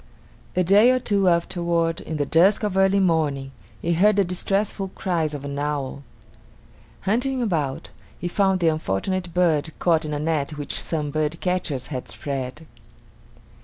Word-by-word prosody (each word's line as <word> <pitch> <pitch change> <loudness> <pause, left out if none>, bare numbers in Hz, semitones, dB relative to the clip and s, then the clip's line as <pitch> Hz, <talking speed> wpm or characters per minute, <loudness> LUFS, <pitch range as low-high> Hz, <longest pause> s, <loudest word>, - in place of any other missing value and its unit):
A 185 - +3
day 205 +7 +6
or 255 0 +3
two 200 -6 +2
afterward, 170 -1 0
in 160 - -5
the 145 - 0
dusk 185 +9 +4
of 205 -3 -1
early 195 +1 +4
morning, 150 -7 +1 0.3
he 170 - +1
heard 205 +5 +4
the 200 - +4
distressful 195 +2 -1
cries 165 -5 -1
of 140 -1 -7
an 140 0 -4
owl. 145 -2 -3 1.0
Hunting 250 +6 0
about, 160 - -2 0.3
he 175 - -4
found 190 0 +1
the 170 - +3
unfortunate 165 - -2
bird 160 -3 +2
caught 165 -2 +2
in 155 - -4
a - - -1
net 150 -1 -1
which 145 - -2
some 150 -3 -2
birdcatchers 155 -1 -1
had 130 -4 -5
spread. 140 +2 -5
170 Hz, 155 wpm, -23 LUFS, 150-190 Hz, 1.0 s, day